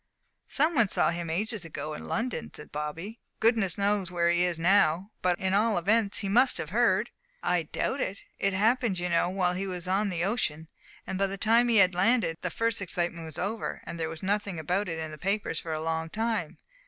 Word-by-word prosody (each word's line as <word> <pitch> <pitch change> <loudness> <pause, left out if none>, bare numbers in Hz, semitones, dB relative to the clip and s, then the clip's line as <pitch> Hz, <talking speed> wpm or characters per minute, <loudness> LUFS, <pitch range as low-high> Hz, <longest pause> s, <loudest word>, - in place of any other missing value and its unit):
"Some 310 +4 +2
one 235 -8 +4
saw 180 - +2
him 170 -1 -4
ages 210 +4 -2
ago 155 -1 -5
in - - -7
London," 230 0 -2
said 150 - -11
Bobby. 160 +9 -5 0.2
"Goodness 220 -5 +2
knows 200 -2 +1
where 170 -1 +2
he 175 0 +2
is 175 -2 0
now. 185 +1 +3
But 180 -1 +2
in 190 +1 -1
all 215 +1 +3
events, 205 +3 +2
he 205 - -3
must 245 +7 +4
have 155 - -4
heard." 220 -1 +2 0.3
"I 175 0 +2
doubt 275 - -1
it. 195 - -3 0.2
It 195 -1 +1
happened, 220 +1 +2
you 180 0 -2
know, 170 +1 +2
while 180 -1 +1
he 190 +2 -3
was 180 -2 -5
on 200 +3 +1
the 175 -2 -1
ocean, 160 -7 -1 0.4
and 190 - -4
by 195 - +3
the 195 +1 -5
time 230 +4 +4
he 235 -2 +4
had 185 -2 +6
landed, 180 -3 +2
the 180 - -1
first 230 +4 -1
excitement 175 -3 -2
was 160 - -9
over, 215 +4 -3
and 170 - -7
there 160 -1 -1
was 160 +1 -8
nothing 200 -1 -1
about 180 +5 -1
it 165 - -3
in 160 -1 -4
the 155 - -9
papers 195 -2 -1
for 165 - -6
a 155 - -2
long 160 0 -2
time. 225 +4 -2
190 Hz, 220 wpm, -28 LUFS, 170-215 Hz, 0.4 s, had